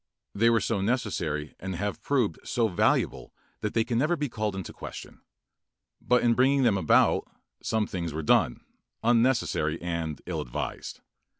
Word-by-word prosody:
They 115 +3 +3
were 115 -1 +4
so 110 -2 -1
necessary 90 - -1
and 95 0 -4
have 100 +3 -3
proved 125 - 0
so 115 -2 +1
valuable 90 -5 +1 0.3
that 105 - -3
they 115 - +3
can 120 0 -1
never 155 +6 +2
be 145 -3 -2
called 110 -3 -2
in 95 - -4
question. - - -9 0.8
But 125 0 +2
in 120 -1 +4
bringing 135 +3 +3
them 115 -5 +4
about, 95 -5 +3 0.3
some 110 -1 0
things 85 -5 -4
were 80 +2 -4
done, 60 - +3 0.4
unnecessary 115 -10 +2
and 85 -3 -3
ill - - -3
advised. - - -5
105 Hz, 160 wpm, -27 LUFS, 85-120 Hz, 0.8 s, were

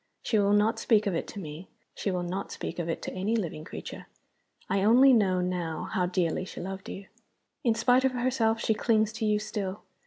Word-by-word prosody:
She 220 - +2
will 200 0 +3
not 220 +2 +3
speak 220 -2 +3
of 200 - 0
it 165 - -2
to 205 - -7
me 160 0 -8 0.3
she - - -3
will 180 -2 -1
not 185 +3 -4
speak - - -5
of 170 -1 -2
it 165 - -3
to - - -5
any 200 +5 -1
living 170 -8 -3
creature. - - -8 0.6
I 195 0 +1
only 255 +5 +7
know 190 -5 +3
now 180 -2 -2
how 180 -1 +1
dearly 180 -1 0
she 185 - -8
loved 190 +1 -6
you. 195 - -7 0.6
In 230 -2 +3
spite 250 +2 +3
of 265 -1 +2
herself 240 -3 +1
she 220 - +1
clings 220 -1 +1
to 220 - -3
you 210 0 +3
still. 210 -2 -4
205 Hz, 215 wpm, -28 LUFS, 180-225 Hz, 0.6 s, only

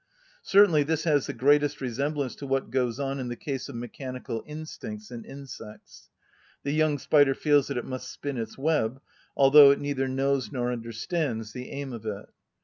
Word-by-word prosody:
Certainly 195 -6 +5
this 160 +1 0
has 150 -5 +2
the - - -3
greatest 145 +3 +3
resemblance 140 +2 -2
to 140 - -7
what 135 -3 -1
goes 125 -1 0
on 135 0 -2
in 130 - -3
the 120 - -4
case 135 0 -5
of - - -8
mechanical 120 -1 -6
instincts 210 +8 -8
in 235 -1 -7
insects. 135 - -11 0.5
The 140 - -1
young 155 -1 +2
spider 145 -1 +4
feels 145 -3 +3
that 140 - -3
it 120 - -3
must 130 0 -6
spin 140 -3 -5
its 110 -1 -5
web, 135 -4 0 0.4
although 140 +1 +9
it 140 - +3
neither 140 -2 -1
knows 135 -3 0
nor 125 -1 -1
understands 115 - -3
the 125 0 -7
aim 140 -2 -5
of 110 -1 -7
it. 105 -1 -4
135 Hz, 180 wpm, -27 LUFS, 125-145 Hz, 0.5 s, although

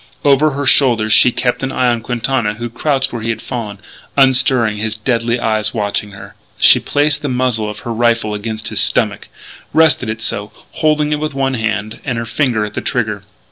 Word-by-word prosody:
Over 145 +1 +4
her 140 +1 -3
shoulder 120 -6 +3
she 125 - +6
kept 125 +1 -1
an 135 0 -2
eye 130 -1 +1
on 120 -1 -2
Quintana 120 -2 -1
who 120 +1 -6
crouched 135 +1 -1
where 120 - -4
he 115 - -3
had 115 -1 -2
fallen, 110 -5 -6 0.4
unstirring, 130 -5 +3
his 110 +1 -2
deadly 115 +1 -1
eyes 110 -1 -1
watching 105 -1 -2
her. 100 - -11 0.2
She - - +6
placed 150 0 0
the 145 - -3
muzzle 125 -4 0
of 105 0 -7
her 120 - -4
rifle 115 -2 +1
against 110 0 -4
his - - -2
stomach, - - 0 0.5
rested 160 -7 +4
it 110 0 -4
so, 105 -1 -2 0.2
holding 150 -1 +1
it 150 - 0
with 155 -2 -4
one 135 -1 0
hand, 110 -2 -3
and 125 -5 -3
her 115 - -3
finger 115 -3 0
at 105 - -8
the - - -3
trigger. - - -2
120 Hz, 200 wpm, -16 LUFS, 110-135 Hz, 0.5 s, she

